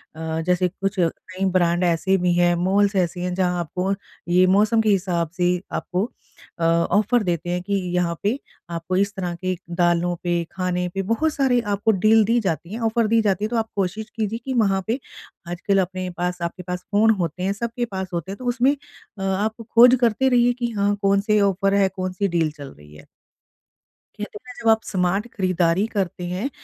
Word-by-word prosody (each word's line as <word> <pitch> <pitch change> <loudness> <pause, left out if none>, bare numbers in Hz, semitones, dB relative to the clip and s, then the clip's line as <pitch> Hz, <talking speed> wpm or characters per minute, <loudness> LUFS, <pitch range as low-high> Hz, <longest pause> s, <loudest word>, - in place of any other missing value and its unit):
अ, 160 0 -3
जैसे 180 0 +2
कुछ 195 +2 -3
नई 185 +3 -2
ब्रांड 175 -1 +2
ऐसे 175 +2 +2
भी 180 -1 +1
हैं, 175 0 +4
मॉल्स 195 +3 +2
ऐसे 175 -1 0
हैं, 180 0 -2
जहाँ 180 -2 0
आपको 180 +4 -2 0.4
ये 180 +1 +5
मौसम 220 +2 +3
के 220 - +1
हिसाब 180 -4 +1
से 180 0 +1
आपको 190 +5 -2 0.5
अ, - - -2
ऑफ़र 205 +8 +2
देते 175 -1 -2
हैं 180 0 -1
कि 200 +2 -3 0.2
यहाँ 170 -1 +1
पे 205 - +3 0.4
आपको 170 +2 -3
इस 200 +1 +1
तरह 180 -3 -3
के 185 +1 -2 0.2
दालों 175 0 +2
पे, 175 -1 0
खाने 180 -1 -1
पे 195 - -1
बहुत 310 +6 +1
सारे 260 -3 +2
आपको 205 +3 +2
डील 220 0 +6
दी 230 +3 +2
जाती 175 -2 -3
हैं, 230 - -4
ऑफ़र 225 0 +1
दी 225 +1 +3
जाती 205 -1 0
है, - - 0
तो 240 - -3
आप 220 0 -1
कोशिश 205 +3 -2
कीजिए 220 0 -2
कि 265 - -2
वहाँ 195 -1 +1
पे 240 +5 0 0.5
आजकल 190 +3 0
अपने 185 0 -4
पास 180 0 -2
आपके 170 +2 -4
पास 180 0 -5
फ़ोन 215 +2 +4
होते 170 +2 -3
हैं, 195 - +1
सबके 235 +3 -3
पास 190 -3 -5
होते 175 +3 -3
हैं, 200 - -6
तो 255 - -9
उसमें 255 +3 +2 0.4
अ, - - -5
आप 210 +4 -1
खोज 245 +2 +8
करते 240 +3 +3
रहिए 245 -1 +4
कि 240 -1 -3
हाँ, 200 0 +2
कौन-से 200 +2 +2
ऑफ़र 195 0 +2
हैं? 200 -1 +3
कौन-सी 185 +1 -2
डील 165 -4 0
चल 145 -2 -10
रही 75 +1 -17
है? - - -14 1.1
कहते 210 0 -6
हैं - - -17
ना, 250 - -8
जब 225 - +3
आप 220 0 +4
स्मार्ट 190 +3 0
खरीदारी 185 0 +1
करते 185 -2 -2
हैं, 185 +10 -2
190 Hz, 205 wpm, -22 LUFS, 175-215 Hz, 1.1 s, खोज